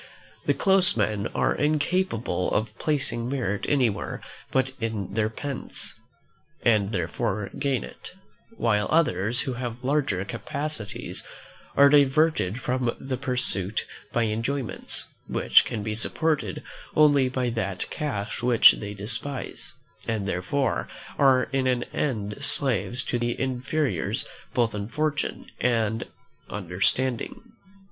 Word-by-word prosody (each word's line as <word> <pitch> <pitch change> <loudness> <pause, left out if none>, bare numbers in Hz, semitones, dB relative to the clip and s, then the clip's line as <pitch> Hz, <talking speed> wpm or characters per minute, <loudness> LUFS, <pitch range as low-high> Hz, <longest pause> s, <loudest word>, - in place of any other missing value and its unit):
The - - +4
close 195 0 +4
men 105 0 +1
are - - +2
incapable 150 - 0
of 110 +1 -1
placing 130 -6 0
merit 115 -7 -1
anywhere 125 -8 +1 0.3
but 130 0 +2
in 110 -4 -3
their 110 -1 +1
pence, 135 +4 -5 0.7
and 105 -3 +3
therefore 100 +2 -2
gain 140 -3 +1
it; - - -10 0.4
while 105 -3 +2
others, 120 - +2
who 130 - -2
have 120 0 -5
larger 130 -9 +1
capacities, 130 +1 -5 0.5
are 140 - +9
diverted 140 - +4
from 125 -2 0
the 135 -1 -3
pursuit 125 -7 -1 0.3
by 120 - +2
enjoyments 115 +4 -1 0.2
which - - +5
can 105 - -3
be 110 0 -2
supported 125 - 0 0.3
only 145 -4 +5
by 125 -1 -1
that 100 -5 -2
cash 115 -10 -3
which 120 -2 +8
they 105 0 -6
despise; 125 +7 -4 0.4
and 110 -3 -1
therefore 95 +9 0 0.3
are 130 -2 +6
in 135 -1 +2
the 125 -1 0
end 110 -2 -2
slaves 125 -4 +1
to 120 - -1
their 120 0 0
inferiors 130 - -1 0.3
both 115 -3 +2
in 100 -1 -3
fortune 150 +4 -1
and 115 -2 +1 0.4
understanding. 110 - -1
120 Hz, 120 wpm, -26 LUFS, 105-140 Hz, 0.7 s, are